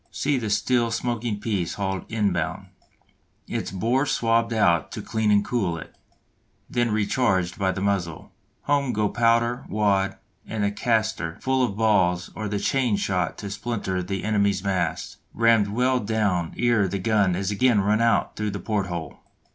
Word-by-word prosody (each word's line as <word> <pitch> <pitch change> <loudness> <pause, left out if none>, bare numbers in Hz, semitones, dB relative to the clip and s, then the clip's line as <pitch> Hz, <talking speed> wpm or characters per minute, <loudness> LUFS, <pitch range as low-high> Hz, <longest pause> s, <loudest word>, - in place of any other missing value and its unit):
See 140 -2 0
the 110 -3 -3
still 120 +3 +1
smoking 115 -2 -2
piece 100 -5 -2
hauled 95 0 -3
inboard, 100 -7 -1 0.8
its - - -3
bore 120 +9 0
swabbed 115 -1 +1
out 95 -7 +2
to - - -5
clean 110 -1 0
and 105 -1 +4
cool 95 -9 -1
it, - - -10 0.7
then 120 -1 0
recharged 100 -4 0
by 95 -1 +2
the 95 - -4
muzzle; 95 -5 -2 0.3
home 140 -3 +1
go 105 -1 +1
powder, 115 +1 +2
wad, 100 -2 +1 0.3
and 110 -2 -2
the 100 - +1
castor 110 -6 -1
full 130 0 +1
of 105 -5 -1
balls 95 -5 +2
or 110 - -4
the 100 0 -2
chain 125 +1 +1
shot 90 -4 -1
to 100 -2 -6
splinter 100 -4 -3
the 95 +1 -4
enemy's 100 -3 +1
masts, 90 -5 -2 0.2
rammed 115 -2 +4
well 125 +5 +1
down 100 -6 -1
ere 120 -5 +2
the 100 - -2
gun 100 -2 +2
is 95 +2 -2
again 115 +1 +3
run 105 +3 +2
out 115 -2 +2
through 105 0 -2
the 100 0 -4
port 100 0 -1
hole. 85 -4 -6
105 Hz, 165 wpm, -24 LUFS, 95-115 Hz, 0.8 s, and